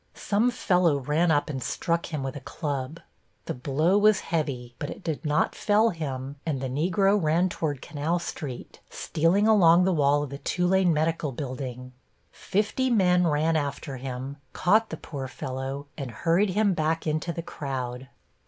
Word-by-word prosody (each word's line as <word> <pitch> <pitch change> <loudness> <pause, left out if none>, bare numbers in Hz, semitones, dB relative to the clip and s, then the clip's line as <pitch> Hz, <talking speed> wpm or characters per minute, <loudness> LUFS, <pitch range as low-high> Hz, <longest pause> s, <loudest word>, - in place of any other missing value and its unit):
Some 215 +4 +1
fellow 180 -10 +2
ran 150 +6 +1
up 145 -2 +2
and 135 -4 -4
struck 170 +6 -1
him 150 -4 -3
with 135 -1 -4
a - - -5
club. 140 +1 -4 0.4
The - - -3
blow 155 +9 +1
was 210 -1 +4
heavy, 130 -7 -2
but 145 - -4
it 205 - -8
did 160 -1 -3
not 150 -1 +1
fell 215 +2 +3
him, 140 -4 -5
and 150 -5 -2
the 130 0 -3
Negro 195 +8 +2
ran 165 +4 +2
toward 145 -6 -3
Canal 155 +3 -1
Street, 145 -6 -6
stealing 175 +7 +1
along 180 -5 +6
the 190 0 +2
wall 145 -1 +3
of 140 - -6
the 140 - -6
Tulane 180 +2 +2
Medical 155 -1 0
Building. 125 -1 -6 0.4
Fifty 215 +6 -1
men 180 -6 +4
ran 155 +1 +2
after 140 -2 -3
him, 130 +2 -6 0.2
caught 215 +5 +3
the 160 - -5
poor 140 -4 -6
fellow 135 +2 -5
and 135 -3 -4
hurried 170 - +1
him 205 +1 +2
back 160 0 -1
into 155 +2 -1
the 170 0 -5
crowd. 130 -4 -5
155 Hz, 170 wpm, -26 LUFS, 135-180 Hz, 0.4 s, along